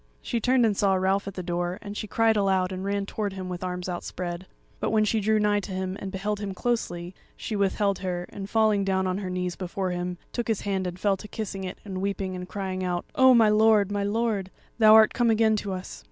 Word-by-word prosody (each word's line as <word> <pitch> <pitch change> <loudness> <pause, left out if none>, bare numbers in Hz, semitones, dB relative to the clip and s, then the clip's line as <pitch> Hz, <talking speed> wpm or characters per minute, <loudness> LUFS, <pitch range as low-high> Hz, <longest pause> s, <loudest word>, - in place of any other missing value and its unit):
She 235 - -1
turned 250 +1 +3
and 215 -2 +2
saw 195 -1 +2
Ralph 190 +2 +1
at 195 - -6
the 185 - -4
door, 175 +1 -2
and 205 0 -8
she 215 - -4
cried 225 +1 +2
aloud 190 -2 +2
and 185 0 -4
ran 200 0 -1
towards 205 -1 -3
him 185 -1 -5
with 180 0 -5
arms 180 0 -4
outspread. 175 0 -5 0.3
But - - -1
when 215 -1 +3
she 220 +1 +1
drew 215 +1 +2
nigh 210 0 +2
to 205 - -7
him 185 0 -3
and 195 - -5
beheld 205 +2 -2
him 200 -2 -4
closely, 180 -7 -2 0.2
she 215 - -4
withheld 200 0 +1
her, 180 -2 -3
and 195 -1 -7
falling 215 -2 +3
down 190 -1 +1
on 185 +1 -1
her 190 -2 -4
knees 180 -1 -2
before 185 0 -3
him 180 0 -3 0.2
took 240 - -2
his 225 -3 0
hand 190 -2 -1
and 180 0 -6
fell 195 0 +2
to 210 - -10
kissing 200 -3 -5
it 185 - -6
and 190 -2 -5
weeping 195 -1 -2
and 180 0 -7
crying 190 -2 -3
out, 175 -1 -2
"O 260 -1 +6
my 225 -2 +6
lord, 210 -2 +4
my 205 0 -1
lord, 205 -2 0 0.3
thou 215 -1 +8
art 220 -1 +7
come 240 -2 +2
again 220 0 +4
to 200 -1 -4
us!" 185 0 -6
195 Hz, 240 wpm, -26 LUFS, 185-215 Hz, 0.3 s, thou